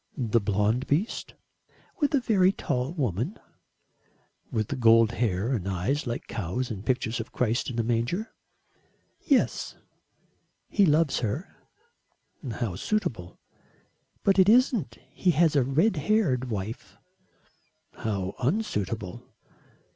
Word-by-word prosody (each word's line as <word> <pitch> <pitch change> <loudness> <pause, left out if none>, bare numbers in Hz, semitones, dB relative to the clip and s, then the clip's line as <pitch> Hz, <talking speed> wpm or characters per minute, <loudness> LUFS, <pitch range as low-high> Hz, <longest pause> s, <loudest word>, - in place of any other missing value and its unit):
"The 115 -3 +1
blond 105 +5 +1
beast?" 170 +11 -1 0.6
"With 290 0 +2
a - - +4
very 195 -6 +3
tall 135 -7 -2
woman." 130 - -2 1.1
"With 110 +5 -2
gold 115 -1 +6
hair 115 0 0
and 100 -7 -2
eyes 95 +11 -1
like 120 - -3
cows 115 +6 -3
in 100 -4 -5
pictures 120 -1 -1
of 115 - -6
Christ 120 +1 0
in 120 - -5
a 115 - +1
manger?" 120 - -1 0.9
"Yes. 275 -5 +1 0.9
He 200 -3 +4
loves 150 -1 +3
her." 125 - -3 1.0
"How 110 -5 -3
suitable." 95 - -2 0.9
"But 195 -1 +3
it 190 +1 +6
isn't. 225 - +3
He 185 - 0
has 165 -2 +4
a 140 - +5
red 155 - +2
haired 150 - +1
wife." 105 +1 -5 1.0
"How 100 -4 -3
unsuitable." 120 - -2
125 Hz, 115 wpm, -27 LUFS, 110-170 Hz, 1.1 s, gold